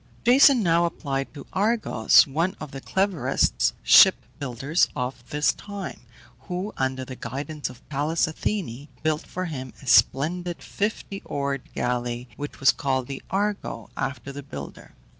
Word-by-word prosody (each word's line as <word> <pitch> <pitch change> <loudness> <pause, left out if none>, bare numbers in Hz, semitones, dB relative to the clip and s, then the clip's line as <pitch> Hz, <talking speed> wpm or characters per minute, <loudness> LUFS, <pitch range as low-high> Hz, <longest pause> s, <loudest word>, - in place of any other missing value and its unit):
Jason 255 0 +6
now 170 -1 +3
applied 135 -5 -3
to 140 -2 -10
Argos, 205 - +4
one 165 +7 -1
of 150 -3 -7
the 135 - -7
cleverest 190 0 +1
ship - - +8 0.2
builders 140 +5 +1
of 125 +1 -4
his 150 0 +2
time, 200 -2 -7 0.5
who, 185 +4 -3
under 130 0 -1
the 130 - -8
guidance 140 +6 -5
of 125 -1 -15
Pallas 150 +3 +1
Athene, 155 - -3 0.2
built 155 0 0
for 185 +1 -4
him 130 -6 -6
a - - -14
splendid 175 +7 +3
fifty 205 -1 -3
oared 140 -4 -3
galley, 120 0 -2
which 145 +2 -7
was 135 - +6
called 130 -2 -1
the 135 +1 -6
Argo, 200 - -2
after 135 0 -4
the 140 +1 -7
builder. 70 - -9
145 Hz, 145 wpm, -25 LUFS, 130-180 Hz, 0.5 s, ship